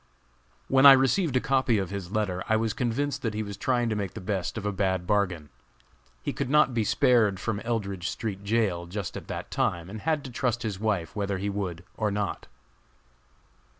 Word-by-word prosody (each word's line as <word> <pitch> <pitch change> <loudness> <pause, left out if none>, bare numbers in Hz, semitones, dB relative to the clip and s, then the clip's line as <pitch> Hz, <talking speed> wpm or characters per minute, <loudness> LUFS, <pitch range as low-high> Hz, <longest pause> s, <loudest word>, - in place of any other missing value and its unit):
When 135 +1 +7
I 140 - +12
received 135 +2 +2
a - - +4
copy 130 -3 +2
of 95 -2 -2
his 100 -3 -5
letter, 100 -4 -1
I 110 - +4
was 110 0 0
convinced 135 +4 -1
that 110 -3 -2
he 110 - -1
was 100 -1 -6
trying 120 +2 0
to 110 - 0
make 100 -3 -3
the - - -5
best 95 +1 -3
of 105 - -4
a 105 - +1
bad 95 -2 0
bargain. 90 -6 0 0.7
He - - -2
could - - -3
not 150 -2 +4
be 115 -2 +1
spared 105 -3 +3
from 105 +1 -2
Eldridge 100 -6 -2
street 100 -3 -4
jail 100 -5 0
just 95 0 -5
at - - -7
that - - -6
time 85 +1 -1
and 110 0 -7
had 155 -2 0
to 130 - -8
trust 120 0 -1
his 105 -4 -3
wife 100 -7 -1
whether 100 -2 -1
he 100 +2 -2
would 95 -3 -4
or 105 -1 +1
not. 100 0 -3
105 Hz, 205 wpm, -27 LUFS, 95-120 Hz, 0.7 s, I